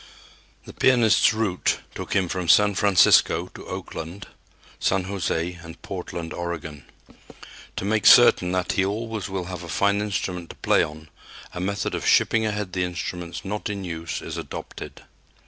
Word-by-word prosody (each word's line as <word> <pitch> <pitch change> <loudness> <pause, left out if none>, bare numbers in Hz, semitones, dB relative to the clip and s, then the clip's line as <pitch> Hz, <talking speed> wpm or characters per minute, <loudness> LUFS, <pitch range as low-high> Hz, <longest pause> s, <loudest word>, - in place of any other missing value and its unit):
The - - -11
pianist's 120 -5 +4
route 110 -5 0 0.2
took - - -5
him 95 -2 +2
from 90 -1 -3
San 105 +3 +6
Francisco 100 -1 +4
to - - -11
Oakland, 85 +5 -7 0.5
San 95 -1 +1
José, 85 -3 -3
and 80 0 -11
Portland, 85 -3 -6
Oregon. 80 -4 -6 0.9
To - - -4
make 105 +1 +2
certain 90 -7 +7
that 90 -1 0
he 95 - +1
always 110 +1 -3
will 95 -2 -3
have 90 0 -6
a 85 - -9
fine 100 +7 +1
instrument 90 -4 -3
to - - -10
play - - +2
on, 80 0 -5 0.4
a - - -5
method 100 +2 -2
of - - -3
shipping 110 -1 +3
ahead 105 -3 -3
the 90 - 0
instruments 90 0 -5
not 105 +2 -3
in 100 -2 -4
use 85 -2 -5
is - - -6
adopted. - - -8
95 Hz, 160 wpm, -24 LUFS, 85-100 Hz, 0.9 s, certain